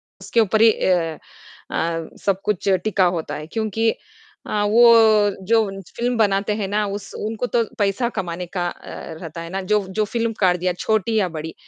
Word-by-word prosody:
उसके 230 Hz, -, -2 dB
ऊपर 220 Hz, +1 st, +2 dB
ही 225 Hz, -, +8 dB
अ 170 Hz, -6 st, 0 dB, 0.5 s
अ, 165 Hz, -1 st, -2 dB, 0.2 s
सब 195 Hz, -1 st, +1 dB
कुछ 205 Hz, -1 st, -1 dB, 0.2 s
टिका 200 Hz, -3 st, +2 dB
होता 160 Hz, -, -4 dB
है। 150 Hz, -, -7 dB
क्योंकि 220 Hz, +3 st, 0 dB, 0.6 s
अ, 210 Hz, -1 st, -1 dB
वो 220 Hz, -1 st, +6 dB, 0.2 s
जो 225 Hz, 0 st, +4 dB
उन 195 Hz, 0 st, -7 dB, 0.2 s
फिल्म 245 Hz, +1 st, 0 dB
बनाते 205 Hz, -1 st, +2 dB
हैं 200 Hz, -3 st, -3 dB
ना, 210 Hz, +1 st, 0 dB
उस 200 Hz, 0 st, -6 dB
उनको 220 Hz, +3 st, -3 dB
तो 240 Hz, -1 st, +1 dB
पैसा 205 Hz, +4 st, +1 dB
कमाने 175 Hz, -1 st, -4 dB
का 175 Hz, 0 st, -2 dB
अ, -, -, -6 dB, 0.5 s
रहता 165 Hz, -1 st, -7 dB
है 165 Hz, -, -7 dB
ना, 195 Hz, +1 st, -3 dB
जो 205 Hz, +1 st, +1 dB
जो 210 Hz, +3 st, 0 dB
फिल्मकार 215 Hz, -5 st, 0 dB
दिया 180 Hz, +1 st, -1 dB
छोटी 220 Hz, 0 st, +1 dB
या 190 Hz, -3 st, +1 dB
बड़ी, 160 Hz, 0 st, -6 dB
205 Hz, 185 wpm, -21 LUFS, 180-220 Hz, 0.6 s, ही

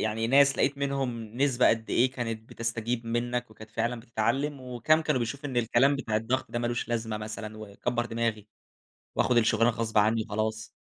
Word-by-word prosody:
يعني 110 Hz, +1 st, 0 dB
ناس 140 Hz, +2 st, +5 dB
لقيت 140 Hz, +1 st, +1 dB
منهم 135 Hz, -4 st, -2 dB
نسبة 130 Hz, -2 st, +3 dB
قدّ 110 Hz, 0 st, 0 dB
إيه 125 Hz, +2 st, +3 dB
كانت 115 Hz, -3 st, -5 dB
بتستجيب 115 Hz, +1 st, -2 dB
منّك 120 Hz, +1 st, -1 dB
وكانت 110 Hz, 0 st, -13 dB
فعلًا 120 Hz, +2 st, -1 dB
بتتعلم، 130 Hz, +5 st, -1 dB
وكام 125 Hz, +5 st, +2 dB
كانوا 150 Hz, -4 st, +1 dB
بيشوفوا 140 Hz, +5 st, -3 dB
إن 130 Hz, -, -5 dB
الكلام 120 Hz, +4 st, +3 dB
بتاع 110 Hz, -5 st, -1 dB
الضغط 120 Hz, +4 st, -1 dB
ده 120 Hz, -, -2 dB
ما 120 Hz, -, -1 dB
لوش 120 Hz, 0 st, -2 dB
لازمة 115 Hz, -2 st, -2 dB
مثلًا 110 Hz, 0 st, -6 dB
وكبّر 120 Hz, +3 st, -3 dB
دماغي، 115 Hz, -2 st, -2 dB, 0.7 s
وآخُد 125 Hz, -, +3 dB
الشُغلانة 115 Hz, 0 st, +4 dB
غصب 110 Hz, -1 st, -2 dB
عنّي 110 Hz, +2 st, +4 dB
وخلاص؟ 110 Hz, +1 st, -2 dB
115 Hz, 175 wpm, -28 LUFS, 110-125 Hz, 0.7 s, ناس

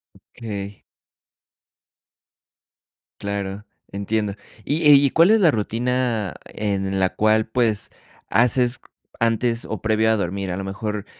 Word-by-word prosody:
Okey. 100 Hz, -4 st, -8 dB, 2.4 s
Claro, 100 Hz, 0 st, -4 dB, 0.3 s
entiendo. 100 Hz, +1 st, -2 dB, 0.3 s
¿Y 150 Hz, +1 st, +1 dB
eh, 145 Hz, -, +9 dB
y 140 Hz, 0 st, +5 dB
cuál 170 Hz, +6 st, +5 dB
es 220 Hz, -, +5 dB
la 175 Hz, -5 st, +5 dB
rutina 115 Hz, -, -1 dB
en 95 Hz, -2 st, -2 dB
la 95 Hz, -1 st, +2 dB
cual, 110 Hz, 0 st, +3 dB
pues, 110 Hz, -3 st, 0 dB, 0.4 s
haces 125 Hz, +1 st, +2 dB, 0.4 s
antes 115 Hz, +1 st, +1 dB
o -, -, -5 dB
previo 110 Hz, 0 st, +2 dB
a 110 Hz, -, +2 dB
dormir? 95 Hz, 0 st, -3 dB
A 90 Hz, -, -3 dB
lo 95 Hz, -, -4 dB
mejor 105 Hz, +1 st, -4 dB
110 Hz, 125 wpm, -22 LUFS, 100-120 Hz, 2.4 s, eh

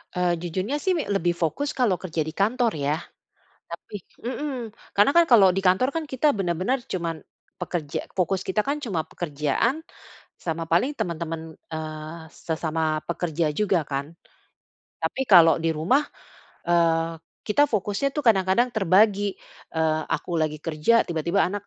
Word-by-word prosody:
Eee, 180 Hz, -1 st, +2 dB
jujurnya 185 Hz, -, -2 dB
sih, 380 Hz, -, +2 dB
mi 310 Hz, -, -1 dB
lebih 175 Hz, -2 st, +1 dB
fokus 175 Hz, -, -1 dB
kalau 220 Hz, -9 st, +2 dB
kerja 170 Hz, -3 st, -3 dB
di 155 Hz, -, -5 dB
kantor, 230 Hz, +3 st, +2 dB
ya. 145 Hz, +1 st, 0 dB, 0.8 s
Tapi -, -, -9 dB, 0.3 s
heeh. 290 Hz, +3 st, -3 dB, 0.4 s
Karena 205 Hz, +6 st, +4 dB
kan 340 Hz, -, +8 dB
kalau 200 Hz, -5 st, +8 dB
di -, -, +2 dB
kantor 185 Hz, +8 st, +4 dB
kan, 325 Hz, -, -1 dB
kita 260 Hz, +4 st, +1 dB
bener-bener 185 Hz, +7 st, 0 dB
cuma 170 Hz, -3 st, -1 dB, 0.5 s
pekerja 155 Hz, -5 st, -3 dB, 0.2 s
fokus 185 Hz, +1 st, +1 dB
kita 200 Hz, +3 st, 0 dB
kan 285 Hz, -, 0 dB
cuma 190 Hz, -8 st, -1 dB
pekerjaan, 155 Hz, -, -1 dB, 0.6 s
sama 165 Hz, -1 st, -3 dB
paling 255 Hz, -, +3 dB
teman-teman, 165 Hz, -1 st, -3 dB, 0.3 s
eee, 155 Hz, +1 st, -6 dB
sesama 160 Hz, -1 st, -2 dB
pekerja 170 Hz, -1 st, -1 dB
juga 200 Hz, -4 st, +2 dB
kan. 140 Hz, +3 st, -3 dB, 0.9 s
Tapi -, -, -2 dB
kalau 165 Hz, -3 st, +8 dB
di 165 Hz, -, +2 dB
rumah, 255 Hz, -, +3 dB, 0.7 s
eee 165 Hz, -1 st, +2 dB, 0.3 s
kita 290 Hz, +8 st, +4 dB
fokusnya 210 Hz, +4 st, 0 dB
tuh 295 Hz, -, -1 dB
kadang-kadang, 215 Hz, +1 st, +3 dB
terbagi. 205 Hz, -1 st, +3 dB, 0.4 s
Eee, 155 Hz, -1 st, +1 dB
aku 170 Hz, -2 st, -2 dB
lagi 155 Hz, -1 st, -1 dB
kerja, 165 Hz, +9 st, +3 dB
tiba-tiba 170 Hz, +3 st, +1 dB
anak, 205 Hz, +1 st, -5 dB
180 Hz, 145 wpm, -25 LUFS, 160-215 Hz, 0.9 s, kan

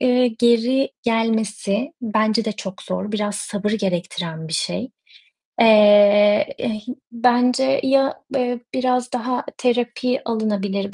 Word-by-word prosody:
eee, 250 Hz, 0 st, +3 dB
geri 235 Hz, +3 st, +1 dB
gelmesi 225 Hz, +2 st, -1 dB
bence 220 Hz, 0 st, 0 dB
de 220 Hz, -, -2 dB
çok 190 Hz, -1 st, -8 dB
zor. 195 Hz, +3 st, -5 dB
Biraz 210 Hz, -1 st, -2 dB
sabır 205 Hz, 0 st, -3 dB
gerektiren 175 Hz, -5 st, -3 dB
bir -, -, -8 dB
şey. 245 Hz, +10 st, -3 dB, 0.7 s
Eee, 205 Hz, +1 st, +6 dB
ih 215 Hz, -2 st, -4 dB, 0.3 s
bence 250 Hz, +3 st, +2 dB
ya, 270 Hz, 0 st, +1 dB
eee, 245 Hz, -2 st, -1 dB
biraz 250 Hz, -1 st, 0 dB
daha 250 Hz, +1 st, -2 dB
terapi 245 Hz, +1 st, -1 dB
alınabilir 205 Hz, -3 st, -2 dB
225 Hz, 115 wpm, -20 LUFS, 205-250 Hz, 0.7 s, Eee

